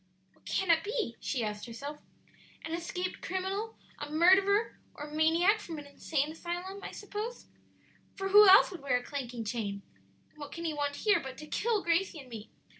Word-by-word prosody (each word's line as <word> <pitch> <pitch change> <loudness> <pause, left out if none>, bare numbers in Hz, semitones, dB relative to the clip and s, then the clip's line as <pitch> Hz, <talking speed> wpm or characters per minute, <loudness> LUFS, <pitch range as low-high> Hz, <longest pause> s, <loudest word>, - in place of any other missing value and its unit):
"What - - -31
can 380 -3 +1
it 325 -1 +3
be?" 425 - -2
she 255 -5 -2
asked 210 +1 -4
herself. 280 +6 -7 0.7
"An 320 - -5
escaped 360 +2 -4
criminal 385 +5 -3 0.2
a 295 - -5
murderer 385 +7 +4 0.2
or 295 - -7
a 300 0 -9
maniac 335 +7 +3
from 335 -6 -7
an 295 - -8
insane 285 +1 -2
asylum, 355 +4 -5
I - - -5
suppose; 420 +4 -6 0.7
for 390 0 -3
who 415 0 +9
else 385 - +8
would 360 - -8
wear 275 -3 +1
a 245 - -6
clanking 245 -4 -5
chain? 205 -3 -3 0.5
and 305 - -23
what 290 -1 -8
can 335 0 -6
he 320 - -1
want 285 -1 -2
here 415 -1 +5
but 265 -1 -8
to 305 - -8
kill 430 +6 0
Gracie 340 +1 +1
and 265 -3 -12
me? 225 -2 -8
330 Hz, 190 wpm, -31 LUFS, 285-385 Hz, 0.7 s, who